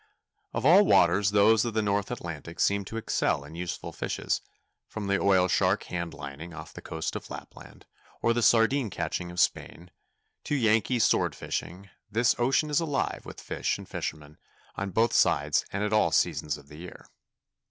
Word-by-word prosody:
Of 115 +2 -3
all 180 +7 +8
waters 95 - +4
those 105 +2 +4
of 115 -2 -3
the 110 - +1
North 100 0 0
Atlantic 85 -8 -7
seem 100 0 +2
to 115 - -6
excel 70 -9 0
in 75 - -12
useful 85 +1 -5
fishes; - - -2 0.5
from 110 -2 -6
the 100 0 +1
oil 95 -2 +4
shark 95 +2 +2
hand 85 -2 -5
lining 70 +4 -8
off - - -10
the - - -9
coast 80 0 -4
of - - -7
Lapland, - - -11 0.3
or 115 - +2
the 120 - 0
sardine 115 +2 +3
catching 90 -1 -3
of 90 0 -6
Spain, 85 0 -1 0.5
to 150 - 0
Yankee 115 0 +2
sword 115 - +2
fishing, 95 +2 -5 0.2
this 115 +3 +3
ocean 135 +5 +2
is 145 - +3
alive 155 -4 -1
with - - -9
fish - - -2
and - - -11
fishermen, 75 -1 -6 0.4
on 100 0 -3
both 110 +4 +1
sides - - +2
and 100 +1 -2
at 105 0 -1
all 105 - +3
seasons 75 -1 +1
of 70 -1 -16
the 75 - -13
year. 90 +2 -11
100 Hz, 180 wpm, -28 LUFS, 85-115 Hz, 0.5 s, all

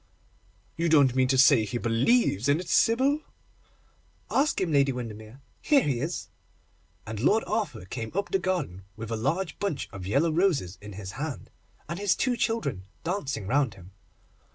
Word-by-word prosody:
'You 170 +1 +1
don't 140 -5 +5
mean 130 0 +3
to 130 +1 +2
say 135 +1 +7
that 110 -2 -2
he 120 - -2
believes 120 - +2
in 145 +3 +3
it, 180 - -7
Sybil?' 260 - +3 1.1
'Ask 290 +3 +2
him, 180 -4 0
Lady 140 -2 +4
Windermere, 115 0 -8 0.2
here 285 -5 +4
he 130 -5 0
is'; 160 +7 -4 0.8
and 110 -1 -5
Lord 210 - +3
Arthur 205 - -2
came 115 +3 -5
up 200 +1 -2
the 195 - +2
garden 175 - -2
with 115 +1 -7
a - - 0
large 160 +11 -2
bunch 200 -8 -2
of 95 -2 -7
yellow 145 +10 +2
roses 155 - +1
in 105 0 -9
his 95 -1 -7
hand, 145 +2 -6 0.4
and 170 +3 -5
his 205 -2 +2
two 255 -2 0
children 140 - -2 0.2
dancing 145 - -3
round 130 -1 +1
him. 95 0 -14
140 Hz, 175 wpm, -27 LUFS, 110-185 Hz, 1.1 s, say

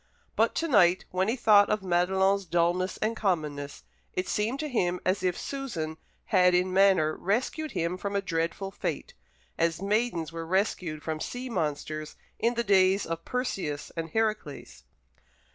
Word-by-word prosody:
But - - +2
to 330 - 0
night, 185 - +4
when 185 +1 0
he 225 - +1
thought 210 -4 +5
of 210 -2 0
Madelon's 190 +2 +2
dulness 175 +2 +1
and 225 +1 0
commonness, 150 -9 -2 0.3
it 185 - -2
seemed 225 +6 -1
to 305 - -2
him 180 -9 0
as 185 +1 +1
if 180 -1 0
Susan 180 - -4 0.3
had 180 -2 +4
in 180 +1 +1
manner 190 -5 +4
rescued 260 - -1
him 170 +2 -2
from 200 +1 -3
a 200 - +2
dreadful 170 +2 -2
fate - - -4 0.5
as 165 -1 +1
maidens 200 -5 0
were 165 0 -5
rescued 175 -3 -1
from 155 -1 -3
sea 250 +8 -5
monsters 155 -4 -3 0.2
in 235 +1 +1
the 235 - 0
days 195 -1 +4
of 165 0 -5
Perseus 195 - -3
and 165 -1 -4
Heracles. 215 -8 -3
185 Hz, 160 wpm, -28 LUFS, 165-210 Hz, 0.5 s, thought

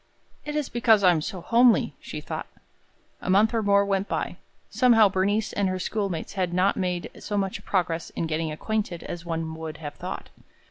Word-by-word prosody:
"It 295 0 -4
is 300 -3 0
because 225 -3 +3
I 180 - +7
am 165 -3 +1
so 185 +2 -5
homely!" 235 +4 +4
she - - -7
thought. - - -5 0.7
A - - -5
month 210 +5 +4
or 225 - +1
more 200 -1 +4
went 195 0 0
by. - - -3 0.3
Somehow 230 -5 +5
Bernice 200 +3 0
and 200 -2 +1
her 185 - -1
schoolmates 195 -2 -3
had 180 -3 -1
not 185 +2 +3
made 180 -2 -2
so 205 - -3
much 195 -1 -2
progress 170 -3 -1
in - - -3
getting 160 0 -2
acquainted 200 +1 -3
as 175 0 -7
one 165 -1 -3
would 160 -1 -6
have 150 -2 -7
thought. - - -6
190 Hz, 190 wpm, -26 LUFS, 170-215 Hz, 0.7 s, I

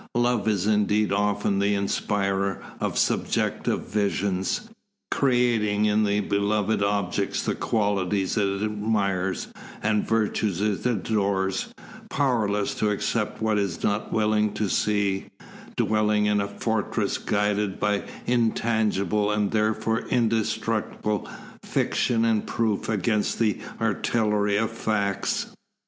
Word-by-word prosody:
Love 120 -2 +1
is 100 -4 +1
indeed 105 -1 +2
often 100 0 +1
the 100 +1 +2
inspirer 100 -1 0 0.2
of - - -2
subjective - - 0
visions, 100 - -1 0.4
creating 120 -6 +2
in 105 0 +3
the 100 0 +1
beloved 100 +1 0
object 100 -1 0
the - - +1
qualities 100 -3 0
it 100 -1 0
admires 105 -3 -1 0.3
and 105 0 +2
the - - -9
virtues 110 -4 +1
it 105 -1 0
adores, 100 - 0 0.4
powerless 110 - +1
to 105 - 0
accept 105 +2 -1
what 110 -1 +2
it - - +2
is 85 -4 -6
not 105 +1 0
willing 105 -1 +2
to 105 - -1
see, 100 0 0 0.5
dwelling 105 -1 +2
in 105 -1 +2
a 100 - -2
fortress 110 +1 -1
guarded 105 -1 0
by 105 -1 +1 0.2
intangible, 110 -3 +1
and 105 -1 0
therefore 110 +1 +1
indestructible, 110 -2 0 0.3
fiction 115 -1 +1
and 110 -2 +1
proof 110 -4 -1
against 105 0 0
the 110 -3 +1 0.2
artillery 105 -3 +1
of 110 +1 0
facts. 105 -3 -1
105 Hz, 120 wpm, -25 LUFS, 100-110 Hz, 0.5 s, in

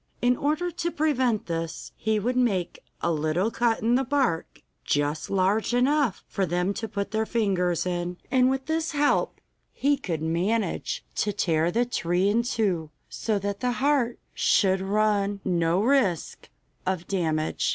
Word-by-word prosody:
In 245 +1 +3
order 310 +7 -1
to 340 0 -2
prevent 260 -9 +1
this, 165 -1 -4
he 220 0 0
would 240 +5 -1
make 205 -9 0 0.2
a 170 - +1
little 160 +7 0
cut 230 -1 +1
in 235 +2 +3
the 260 +2 +3
bark, 260 - -1 0.2
just 145 +2 -1
large 200 +5 +1
enough 265 -3 +2
for 195 - -2
them 180 +2 0
to 225 - -4
put 200 -1 -4
their 220 0 0
fingers 185 -7 0
in, 175 0 -2
and 255 -1 +4
with 265 0 -1
this 320 0 -1
help 290 0 +1 0.3
he 285 +1 +1
could 165 - -4
manage 185 +5 -1
to 210 - +1
tear 165 -4 +1
the 235 +6 +1
tree 185 -4 0
in 225 +3 +3
two, 200 - -1 0.2
so 220 -2 -1
that 200 0 -3
the 250 -1 0
heart 260 -2 +1 0.2
should 190 -2 +3
run 205 0 +1
no 170 -1 +2
risk 225 - +1 0.3
of 185 -2 -2
damage. 160 -5 0
205 Hz, 160 wpm, -26 LUFS, 175-245 Hz, 0.3 s, and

